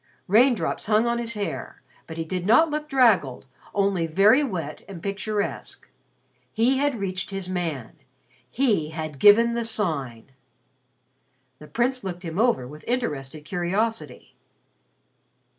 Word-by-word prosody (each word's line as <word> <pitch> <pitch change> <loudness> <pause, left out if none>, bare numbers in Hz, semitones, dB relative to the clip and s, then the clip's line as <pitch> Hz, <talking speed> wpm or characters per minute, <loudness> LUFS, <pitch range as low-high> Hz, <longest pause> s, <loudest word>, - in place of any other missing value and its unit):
Raindrops 220 -3 +2
hung 215 +1 +3
on 235 0 0
his 230 -1 -3
hair, 165 -14 -5 0.2
but 160 - -8
he 165 - -3
did 180 +2 -3
not 300 +9 +5
look 300 0 -3
draggled, 215 - +3 0.3
only 195 -4 +1
very 205 - +5
wet 170 - -4
and 190 -3 -8
picturesque. 205 +1 -4 0.6
He 250 +4 +2
had 285 -4 0
reached 185 -2 -3
his 195 -2 -4
man. 165 -10 -4 0.5
He 215 - +1
had 155 -3 -6
given 230 - +6
the 235 0 -1
Sign. 140 - -3 1.3
The 150 - -12
Prince 250 +5 -1
looked 180 -1 -6
him 165 +3 -4
over 225 - +2
with 150 +3 -12
interested 155 - -3
curiosity. 195 +6 -2
195 Hz, 130 wpm, -24 LUFS, 160-235 Hz, 1.3 s, given